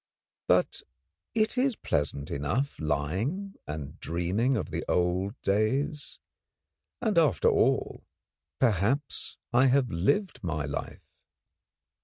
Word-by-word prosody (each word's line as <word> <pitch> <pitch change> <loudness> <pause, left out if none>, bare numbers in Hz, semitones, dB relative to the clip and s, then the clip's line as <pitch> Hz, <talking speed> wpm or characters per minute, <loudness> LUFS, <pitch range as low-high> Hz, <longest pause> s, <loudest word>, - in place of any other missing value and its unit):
But - - +2 0.5
it 220 +3 +2
is 260 -2 +2
pleasant 70 - -2
enough 100 - -1
lying 100 - -1
and 75 -2 -6
dreaming 95 - 0
of - - -4
the - - -2
old 90 +6 0
days; 130 +9 0 0.8
and, 210 -7 +3
after 155 -4 +3
all, - - +1 0.5
perhaps 120 - 0 0.2
I 130 +3 +6
have 130 -1 +3
lived 165 - 0
my 80 -4 -2
life. 70 -1 -5
110 Hz, 105 wpm, -28 LUFS, -, 0.8 s, I